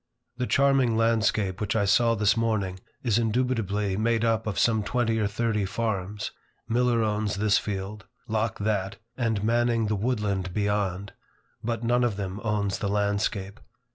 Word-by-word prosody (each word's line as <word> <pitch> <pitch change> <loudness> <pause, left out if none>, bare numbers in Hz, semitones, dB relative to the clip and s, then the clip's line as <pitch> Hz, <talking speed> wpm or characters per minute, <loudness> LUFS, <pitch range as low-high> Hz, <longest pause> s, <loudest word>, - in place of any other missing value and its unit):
The 125 0 -1
charming 135 -4 +3
landscape 110 -4 +1
which 105 - -1
I 105 -2 +2
saw 115 +4 +4
this 105 0 +3
morning, 105 -5 -1 0.2
is 115 -3 +2
indubitably 110 -4 0
made 115 +1 +1
up 115 -1 +1
of 105 - -2
some 110 -2 +3
twenty 115 +2 0
or 105 - +1
thirty 110 0 0
farms. 105 -1 -2 0.4
Miller 120 0 +2
owns 105 -1 0
this 105 +1 +3
field, 100 +1 -5 0.2
Locke 110 +1 -1
that, 100 -1 -1 0.2
and 110 -5 -1
Manning 115 0 +2
the 105 0 0
woodland 100 -5 -1
beyond. 100 -2 -1 0.5
But 115 +1 -2
none 120 +1 +2
of 120 -4 +1
them 95 0 -4
owns 105 -3 0
the 100 - -1
landscape. 100 0 -1
105 Hz, 155 wpm, -26 LUFS, 100-115 Hz, 0.5 s, saw